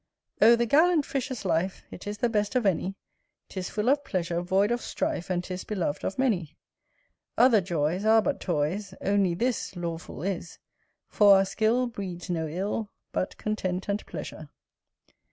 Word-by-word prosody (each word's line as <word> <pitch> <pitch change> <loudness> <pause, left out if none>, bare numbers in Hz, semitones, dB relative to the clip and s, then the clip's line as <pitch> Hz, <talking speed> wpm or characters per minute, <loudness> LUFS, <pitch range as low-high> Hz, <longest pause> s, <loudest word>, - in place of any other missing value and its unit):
O 230 +2 +8
the 235 0 +1
gallant 310 +4 +4
Fisher's 260 -4 -3
life, 180 +2 0
It 185 - -9
is 205 0 -4
the 240 - +2
best 210 0 -1
of 250 -3 +2
any; 190 0 +1 0.5
'Tis 185 -2 -4
full 210 +2 -2
of 285 +2 +3
pleasure, 170 -5 -1
void 190 +4 +2
of 240 0 0
strife, 175 - -3
And 180 -1 0
'tis 185 0 -5
beloved 185 -8 -2
of 195 - -3
many: 185 - 0 0.8
Other 240 -4 +6
joys 170 +1 -1
Are 220 +1 +6
but - - -1
toys; 185 +4 -1
Only 195 -3 +2
this 240 +1 -1
Lawful 170 -1 -5
is; 180 -3 -4 0.5
For 205 -2 +6
our 195 - +3
skill 220 +5 +1
Breeds 190 -6 -5
no 160 -2 -1
ill, 200 +6 -3 0.2
But 185 - -2
content 190 -3 -2
and 200 +1 -1
pleasure. - - -7
195 Hz, 165 wpm, -27 LUFS, 175-225 Hz, 0.8 s, O